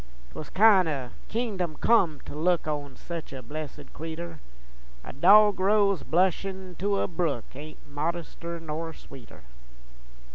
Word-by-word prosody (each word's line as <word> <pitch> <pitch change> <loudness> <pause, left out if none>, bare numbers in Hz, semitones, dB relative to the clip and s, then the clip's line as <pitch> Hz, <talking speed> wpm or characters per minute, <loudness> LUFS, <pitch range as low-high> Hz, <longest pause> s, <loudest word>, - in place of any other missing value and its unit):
'Twas 155 - -8
kin' 195 -3 +6
o' 135 -6 -3 0.2
kingdom 200 -8 -2
come 175 -11 +3
to - - -9
look 170 +2 +1
On 145 -3 -4
sech 170 -2 -7
a 130 -1 -7
blessed 145 +2 -8
cretur, 165 0 -7 0.6
A - - -9
dogrose 200 +4 +5
blushin' 185 +1 0
to 200 +1 +1
a - - 0
brook 165 -8 -2
Ain't 150 +3 -11
modester 170 +3 -4
nor 160 +1 -5
sweeter. 130 - -14
170 Hz, 130 wpm, -27 LUFS, 150-190 Hz, 0.6 s, kin